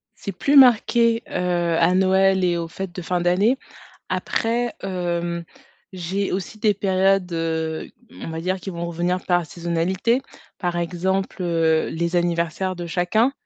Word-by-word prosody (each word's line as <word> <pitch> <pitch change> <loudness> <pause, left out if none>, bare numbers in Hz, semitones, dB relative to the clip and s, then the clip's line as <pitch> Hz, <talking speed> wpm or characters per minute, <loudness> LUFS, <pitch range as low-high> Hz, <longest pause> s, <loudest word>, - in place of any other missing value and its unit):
C'est 200 - -6
plus 280 +10 0
marqué, 235 -2 +5
heu, - - -14 0.5
à 170 +2 +4
Noël 190 0 +3
et 175 -1 +2
aux 165 -1 -3
fêtes 185 +1 -6
de 180 - -6
fin 175 +1 -1
d'année, 195 +9 +3 0.5
après, 235 +1 -1
hem, 175 -2 -2 0.5
j'ai 190 +2 -2
aussi 195 +3 -4
des 210 -1 +2
périodes, 190 -1 +2
heu, 160 -1 -2 0.2
mmh, - - -10
on - - -5
va 160 0 -4
dire 185 +2 -2
qui 190 - -6
vont 170 0 -4
revenir 175 +2 -2
par 175 -1 +2
saisonnalité. 175 - 0 0.4
Par 175 -2 -2
exemple, 185 +2 -2
heu, 165 -2 +2
les 170 +2 -2
anniversaires 175 +1 0
de 175 -1 -5
chacun, 195 +9 +1
180 Hz, 155 wpm, -22 LUFS, 170-195 Hz, 0.5 s, marqué